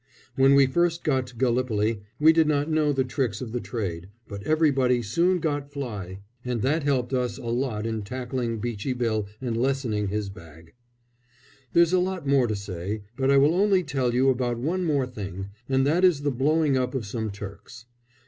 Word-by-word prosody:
When 135 Hz, +1 st, +5 dB
we 140 Hz, 0 st, +6 dB
first 170 Hz, +5 st, +1 dB
got 130 Hz, -5 st, +1 dB
to 125 Hz, -, -14 dB
Gallipoli 115 Hz, -3 st, 0 dB, 0.2 s
we 160 Hz, +2 st, +6 dB
did 160 Hz, -1 st, +3 dB
not 150 Hz, +1 st, +1 dB
know 155 Hz, -1 st, +2 dB
the 135 Hz, -2 st, +1 dB
tricks 125 Hz, -5 st, -2 dB
of 120 Hz, -3 st, -6 dB
the 125 Hz, -, -2 dB
trade, 95 Hz, -8 st, -4 dB, 0.2 s
but 100 Hz, -2 st, -7 dB
everybody 135 Hz, -6 st, +2 dB
soon 170 Hz, -, +2 dB
got 145 Hz, -4 st, -2 dB
fly, 105 Hz, -9 st, -6 dB, 0.2 s
and 125 Hz, -3 st, -2 dB
that 150 Hz, +5 st, +1 dB
helped 135 Hz, -3 st, 0 dB
us 125 Hz, -1 st, -1 dB
a -, -, -9 dB
lot 115 Hz, -2 st, -1 dB
in 110 Hz, -1 st, -2 dB
tackling 120 Hz, +1 st, -3 dB
"Beachy 115 Hz, +2 st, -3 dB
Bill" 110 Hz, -4 st, -1 dB
and 120 Hz, -3 st, -3 dB
lessening 120 Hz, -4 st, 0 dB
his 105 Hz, 0 st, -2 dB
bag. 80 Hz, -3 st, -14 dB, 1.0 s
There's 170 Hz, 0 st, +4 dB
a 185 Hz, -, +5 dB
lot 185 Hz, -2 st, -2 dB
more 135 Hz, -3 st, +3 dB
to 110 Hz, -, -1 dB
say, 100 Hz, +1 st, -5 dB
but 135 Hz, +1 st, 0 dB
I 140 Hz, -, +5 dB
will 145 Hz, +4 st, +5 dB
only 195 Hz, 0 st, +3 dB
tell 135 Hz, -5 st, -1 dB
you 135 Hz, +2 st, +4 dB
about 120 Hz, -2 st, -1 dB
one 175 Hz, +9 st, -1 dB
more 145 Hz, -5 st, +1 dB
thing, 100 Hz, -5 st, -6 dB, 0.2 s
and 135 Hz, 0 st, +2 dB
that 165 Hz, +6 st, +2 dB
is 175 Hz, -6 st, +4 dB
the 145 Hz, -, +1 dB
blowing 145 Hz, +3 st, +2 dB
up 125 Hz, 0 st, -1 dB
of 125 Hz, -5 st, -2 dB
some 110 Hz, +2 st, -3 dB
Turks. 100 Hz, +3 st, -9 dB
125 Hz, 195 wpm, -25 LUFS, 110-145 Hz, 1.0 s, we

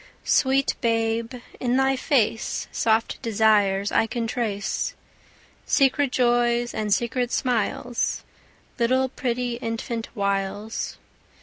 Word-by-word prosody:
Sweet 270 Hz, 0 st, +3 dB
babe, 230 Hz, +1 st, 0 dB, 0.2 s
in 250 Hz, 0 st, +1 dB
thy 270 Hz, 0 st, +3 dB
face 250 Hz, -5 st, 0 dB
Soft 225 Hz, 0 st, +1 dB
desires 205 Hz, -4 st, +2 dB
I 225 Hz, -, +3 dB
can 230 Hz, +1 st, -3 dB
trace, 210 Hz, -5 st, -2 dB, 0.7 s
Secret 275 Hz, 0 st, +3 dB
joys 240 Hz, -1 st, +2 dB
and 215 Hz, -1 st, -2 dB
secret 240 Hz, +3 st, 0 dB
smiles, 245 Hz, -1 st, -1 dB, 0.6 s
Little 260 Hz, +3 st, +2 dB
pretty 245 Hz, -2 st, -2 dB
infant 230 Hz, 0 st, -4 dB
wiles. 200 Hz, +1 st, -2 dB
235 Hz, 100 wpm, -24 LUFS, 220-250 Hz, 0.7 s, Sweet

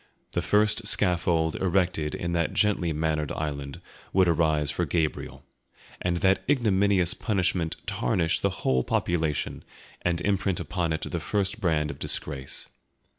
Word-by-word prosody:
The -, -, -1 dB
first 105 Hz, +1 st, +2 dB
scaffold 85 Hz, -5 st, +2 dB
erected 90 Hz, -5 st, 0 dB
in 85 Hz, -, -3 dB
that 85 Hz, -1 st, 0 dB
gently 100 Hz, -5 st, +2 dB
mannered 75 Hz, -1 st, -1 dB
island 70 Hz, -3 st, -4 dB, 0.3 s
would 95 Hz, -1 st, +4 dB
arise 80 Hz, -3 st, +2 dB
for -, -, -1 dB
Gabriel, 80 Hz, -3 st, -2 dB, 0.6 s
and 90 Hz, -1 st, 0 dB
that 95 Hz, 0 st, +3 dB
ignominious 100 Hz, -, +3 dB
punishment 90 Hz, -6 st, -1 dB
tarnish 80 Hz, +7 st, 0 dB
the 100 Hz, -, +1 dB, 0.2 s
whole 65 Hz, -1 st, +3 dB
population 80 Hz, -4 st, -1 dB, 0.4 s
and 85 Hz, -1 st, 0 dB
imprint 100 Hz, -1 st, 0 dB
upon 85 Hz, +1 st, -2 dB
it 80 Hz, 0 st, -2 dB
the -, -, -3 dB
first 105 Hz, +1 st, -1 dB
brand 80 Hz, -5 st, +1 dB
of 70 Hz, -, -11 dB
disgrace. 65 Hz, -3 st, -2 dB
85 Hz, 135 wpm, -26 LUFS, 80-95 Hz, 0.6 s, would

